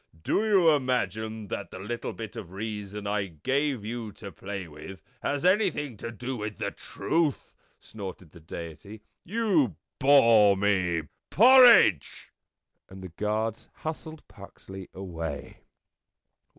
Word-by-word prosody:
" 80 - -24
Do 205 - +1
you 195 -7 +5
imagine 110 -6 -1
that 100 - -5
the - - -9
little 110 +5 -5
bit 110 -1 -8
of 95 -6 -8
reason 105 0 -5
I 100 -1 -1
gave 130 - -1
you 115 -1 -5
to 100 -1 -10
play 95 +1 -7
with 80 +5 -11 0.2
has 145 +3 -2
anything 180 - +2
to 115 - -6
do 125 +3 -5
with 105 -1 -5
the - - -3
truth?" 160 -4 -2 0.3
snorted 95 -6 -9
the 85 - -14
Deity. 85 +6 -9 0.2
"You 180 - +1 0.2
bore 115 -7 +6
me. 95 -5 +1 0.3
Porridge!" 240 - +6 0.6
And 95 0 -11
the 95 - -7
guards 105 +5 -3 0.2
hustled 160 0 -6
Puxley 95 -2 -11
away. 80 -6 -6
105 Hz, 130 wpm, -27 LUFS, 95-140 Hz, 0.6 s, bore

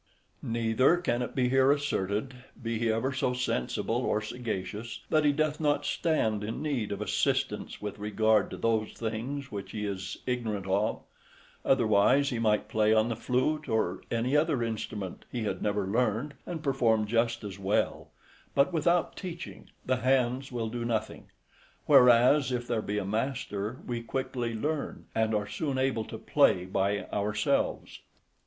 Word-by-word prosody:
Neither 115 +7 +2
can 125 -9 -1
it - - -4
be 130 -2 +2
here 135 +1 +5
asserted, 130 -4 -1 0.3
be 115 -2 -3
he 115 -1 +2
ever 130 +5 0
so 130 -1 0
sensible 125 - -1
or 105 - +1
sagacious, 110 -1 -5
that 155 -1 +3
he 145 - +5
doth 155 +1 0
not 145 -2 +1
stand 110 -11 0
in 110 +2 -4
need 135 -9 -2
of 100 0 -3
assistance 105 - -1
with 105 -1 -5
regard 105 0 +2
to - - -7
those 110 -2 0
things 120 +5 -4
which 100 -2 -6
he 105 -1 -3
is 95 -3 -4
ignorant 110 -6 -2
of; 100 +3 0 0.6
otherwise 125 +3 +4
he 120 - -2
might 105 -2 +2
play 110 0 +3
on 110 +2 +3
the 115 - -1
flute 130 +6 0
or 105 -5 0
any 120 +4 0
other 150 -5 +2
instrument, 105 -4 -4
who 120 -3 -3
had 105 - -2
never 105 -1 0
learned, 115 +6 0
and 165 -3 -5
perform 115 -6 +2
just 115 +2 0
as 100 -1 -7
well; 100 +1 0 0.5
but 140 +6 +3
without 170 +2 +2
teaching, 175 -3 -8 0.2
the 130 0 +1
hands 130 +1 +1
will 115 -2 -2
do 120 +1 -4
nothing; 110 -2 -2 0.6
whereas, 125 +3 +6
if 120 -1 -2
there 115 -2 0
be 105 0 -3
a 105 - -1
master, 110 0 -2
we 120 -1 -3
quickly 125 -1 -3
learn, 150 +6 -3
and 110 -1 +1
are 105 -1 0
soon 130 +7 -2
able 130 -4 0
to - - -7
play 90 - +3
by 100 +2 0
ourselves. 105 +1 0
115 Hz, 160 wpm, -29 LUFS, 105-130 Hz, 0.6 s, whereas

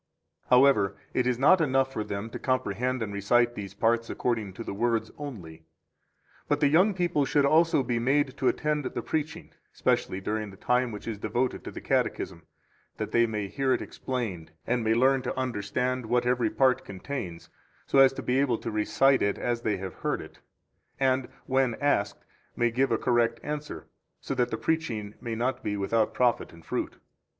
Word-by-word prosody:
26 - - -29
However, 125 -6 +5 0.2
it 125 - +1
is 125 -1 +1
not 165 +8 +5
enough 135 -2 +1
for 110 - -2
them 105 +2 -5
to - - -6
comprehend 125 -1 -1
and 100 -2 -5
recite 120 +4 +2
these 100 -3 -7
parts 115 +2 +1
according 110 -5 -1
to 115 - -7
the - - -5
words 115 +2 0
only, 95 - -8 0.9
but 145 - +1
the 145 -2 +4
young 185 +7 +4
people 175 -5 +1
should 140 +1 +2
also 160 0 +4
be 120 -1 -1
made 135 +2 +1
to 130 - 0
attend 150 -1 0
the 120 -2 -4
preaching, 155 0 -3 0.2
especially 95 - 0
during 105 +2 -3
the 95 - -13
time 125 +2 +1
which 105 +1 -8
is 110 -3 -4
devoted 120 +4 -1
to - - -6
the - - -8
Catechism, 85 -2 -1 0.5
that - - -4
they 120 0 +4
may 105 -3 -3
hear 135 +4 0
it - - -1
explained, 110 -11 -4 0.2
and 120 -1 0
may 110 0 +2
learn 130 +2 +3
to - - -4
understand 125 +1 -2
what 120 +1 +1
every 125 -2 +2
part 130 +1 +2
contains, 95 -3 -6 0.3
so 135 - +3
as 135 -1 +8
to - - -6
be 125 +1 +1
able 130 -5 +2
to - - -5
recite 130 +6 +3
it 100 0 +1
as 120 -1 -1
they 110 -3 0
have 95 0 -6
heard - - -2
it, - - -11 0.6
and, 130 -1 +2 0.2
when 130 -3 +1
asked, 105 -8 0 0.3
may 120 0 +1
give 130 +3 +1
a - - +3
correct 115 -1 +1
answer, 150 0 -5 0.3
so - - -4
that 125 -2 +1
the 110 - -3
preaching 115 -6 -2
may 115 -1 -4
not 125 +3 -1
be 105 0 -2
without 110 +3 +1
profit 125 -2 +1
and 85 -1 -16
fruit. - - -3
120 Hz, 195 wpm, -27 LUFS, 110-135 Hz, 0.9 s, as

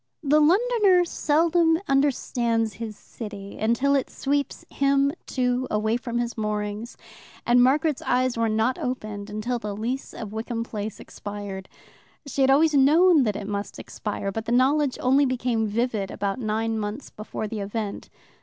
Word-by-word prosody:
The 295 +1 +4
Londoner 385 +2 +4
seldom 325 +1 +2
understands 240 -5 +1
his 220 -2 -5
city 205 -3 -9
until 235 +6 +2
it 275 -2 +1
sweeps 280 0 -2
him, 275 0 +2 0.2
too, 250 0 0
away 215 +1 +1
from 240 -1 -3
his 240 0 -2
moorings, 210 +1 -3 0.5
and 245 +1 +5
Margaret's 285 +3 +2
eyes 255 0 +1
were 230 -1 +1
not 220 +4 +1
opened 215 -5 -4
until 220 +4 -2
the 210 -2 -5
lease 240 +6 -3
of 215 -2 -7
Wickham 230 +1 -3
Place 215 -2 -5
expired. 205 -2 -7 0.6
She 280 -1 -2
had 265 - +4
always 305 +3 +4
known 300 +2 +5
that 210 -2 0
it 205 - -5
must 200 0 -4
expire, 205 -2 -4
but 220 +2 -4
the - - -3
knowledge 265 +3 +3
only 270 +2 +4
became 245 -3 0
vivid 215 -2 -1
about 200 +3 -3
nine 220 0 -1
months 210 +6 -5
before 215 0 -5
the 215 0 -5
event. 205 +1 -4
235 Hz, 155 wpm, -25 LUFS, 215-275 Hz, 0.6 s, and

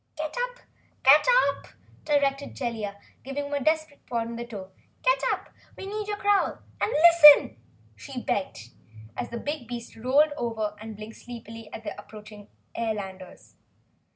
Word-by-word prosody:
"Get 310 0 -4 1.2
up!" - - -13 0.4
directed 280 -1 0
Jellia, 220 -5 -4 0.2
giving 275 +2 -4
him 285 - -6
a 285 -2 -1
desperate 310 -1 0
prod 230 -1 -2
with 235 - -6
her 235 - -4
toe. 195 -5 -8 0.3
"Get - - +3
up! - - -4 0.3
We - - -7
need 420 +1 -4
your 415 -1 -3
growl 405 -1 +2 0.2
and - - +1
LISTEN!" 300 - +8 0.4
she 255 - -7
begged, 190 - -3 0.4
as - - -4
the 235 - -5
big 285 -1 -5
beast 240 -1 -7
rolled 275 +6 +3
over 220 -4 -2
and 220 0 -8
blinked 215 +1 -10
sleepily 225 -2 -10
at 220 - -8
the 205 - -5
approaching 210 -1 -13 0.3
airlanders. 195 -5 -5
240 Hz, 150 wpm, -26 LUFS, 215-295 Hz, 1.2 s, LISTEN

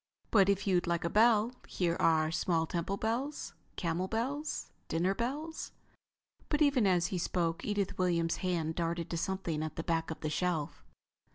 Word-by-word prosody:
"But 200 -3 +5
if 200 0 +1
you'd 185 -3 +2
like 170 -1 0
a 170 - 0
bell, 225 +1 +4
here 170 -2 0
are 160 -1 +3
small 165 -1 +1
temple 175 +4 -2
bells, 240 +8 -2 0.2
camel 175 +1 -1
bells, 270 +8 -2 0.2
dinner 175 +4 +1
bells...." 290 +9 -4 0.8
But 300 0 +3
even 270 -7 +4
as 180 -2 +3
he 180 - 0
spoke, 170 -1 -1
Edith 205 -3 -1
Williams' 170 -2 +1
hand 170 -4 -1
darted 170 0 -2
to 170 - -1
something 170 -3 -2
at 155 0 -4
the 165 - -3
back 165 -1 0
of 160 - -6
the 155 - -1
shelf. 160 -2 -1
180 Hz, 170 wpm, -32 LUFS, 165-215 Hz, 0.8 s, But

